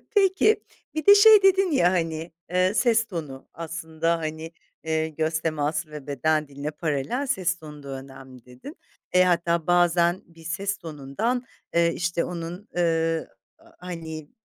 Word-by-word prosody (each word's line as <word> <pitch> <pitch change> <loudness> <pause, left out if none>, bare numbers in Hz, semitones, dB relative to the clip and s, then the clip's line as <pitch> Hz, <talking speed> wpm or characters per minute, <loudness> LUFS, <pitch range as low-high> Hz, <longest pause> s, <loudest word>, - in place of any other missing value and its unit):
Peki, 390 +2 +3 0.3
bir 310 - -2
de 405 - +9
şey 425 0 +8
dedin 385 -2 +4
ya 180 -10 +4
hani, 165 -2 -2 0.2
ııı, 185 +2 +3
ses 230 -1 +3
tonu. 150 -8 -7
Aslında 165 0 -2
hani, 160 +1 -5 0.3
eee, 160 0 0
göz 160 +1 -1
teması 155 -1 -2
ve 150 -2 -9
beden 155 +3 0
diline 140 +2 -5
paralel, 155 - -2
ses 185 -8 0
tonu 150 -2 -11
da 140 - -9
önemli, 135 -2 -10
dedin. 125 - -12 0.3
E, 180 0 +5
hatta 170 -2 +1
bazen 175 0 +3
bir 165 -1 -18
ses 195 +4 -2
tonundan, 165 - -3 0.3
ııı, 170 0 +4
işte 170 0 -1
onun, 175 +4 -6
ııı, 165 -1 +1 0.5
hani 160 -4 -7
165 Hz, 145 wpm, -25 LUFS, 155-185 Hz, 0.5 s, de